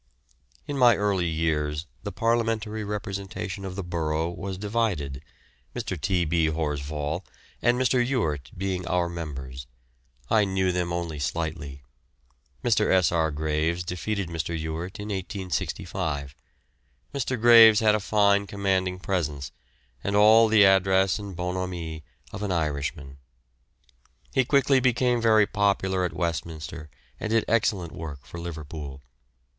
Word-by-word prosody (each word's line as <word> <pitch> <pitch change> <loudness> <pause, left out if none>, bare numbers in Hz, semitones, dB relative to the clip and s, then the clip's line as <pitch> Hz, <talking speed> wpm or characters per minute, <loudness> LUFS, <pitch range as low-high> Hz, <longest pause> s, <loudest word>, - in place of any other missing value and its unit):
In 140 -1 -3
my 120 -2 +7
early 100 -4 +1
years 80 -1 -1 0.2
the 100 - -5
parliamentary 115 0 0
representation 100 -1 -5
of 95 -1 -5
the 100 - -4
borough 80 -1 -1
was 95 +1 -5
divided, 100 - -1 0.5
Mr. - - -3
T. 90 +2 0
B. 80 0 +2
Horsfall 75 +1 -2 0.4
and 120 +1 +3
Mr. 130 -1 +3
Ewart 80 - -1
being 90 -1 -2
our 90 -1 +1
members. 65 -7 -6 0.6
I 110 - +4
knew 95 -1 +1
them 90 -1 -1
only 85 -3 -3
slightly. 70 -2 -4 0.8
Mr. 110 -3 +2
S. 95 -2 +4
R. 80 -2 +2
Graves 80 +3 -1
defeated 90 +3 -3
Mr. 85 0 -3
Ewart 80 +5 -5
in 105 +1 -6
1865. 90 -6 -3 0.8
Mr. 130 -3 -2
Graves 115 -2 +8
had 110 -2 +4
a 105 - +2
fine 100 -1 +2
commanding 95 -2 0
presence 75 -8 -2 0.5
and 100 - -1
all 110 +2 +7
the 110 -2 +6
address 95 0 +4
and 100 -3 -7
bonhomie 90 -3 -4 0.3
of 100 - -7
an 105 -2 -2
Irishman. 70 -3 -2 1.1
He 130 - +3
quickly 140 0 +4
became 125 -1 +2
very 110 -2 +5
popular 100 -3 +1
at 90 - 0
Westminster 80 -2 -4 0.3
and 110 - -3
did 115 0 +2
excellent 100 -6 +1
work 75 -5 -8
for 85 - -9
Liverpool. 75 -4 -7
90 Hz, 130 wpm, -26 LUFS, 80-105 Hz, 1.1 s, Graves